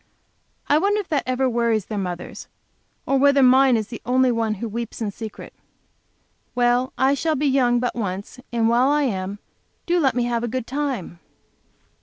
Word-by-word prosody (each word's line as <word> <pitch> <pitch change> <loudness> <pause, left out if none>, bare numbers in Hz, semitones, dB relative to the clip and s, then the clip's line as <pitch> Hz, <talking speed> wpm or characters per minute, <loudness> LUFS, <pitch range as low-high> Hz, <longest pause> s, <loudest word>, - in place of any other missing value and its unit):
I 295 - +4
wonder 405 +4 +1
if 405 - -6
that 295 -3 +1
ever 255 +1 +1
worries 230 -4 0
their 210 -2 -4
mothers, 180 -2 -6 0.6
or 275 - +1
whether 280 0 +5
mine 260 -1 +5
is 215 -1 -4
the 230 - -8
only 255 +1 +2
one 225 -2 -1
who 230 +4 -5
weeps 230 +1 -5
in 215 -3 -2
secret? 220 +1 -9 1.0
Well, 245 +1 +2
I 265 +1 +3
shall 315 +3 0
be 295 +1 -1
young 255 -3 +3
but 245 0 -1
once, 200 0 -5
and 230 -1 +1
while 240 +3 +3
I 295 0 +2
am, 195 -5 -2 0.5
do 350 +1 +2
let 265 -7 +2
me 245 - +1
have 240 -1 -1
a - - -1
good 255 0 -3
time! 265 - -4
245 Hz, 185 wpm, -22 LUFS, 225-270 Hz, 1.0 s, whether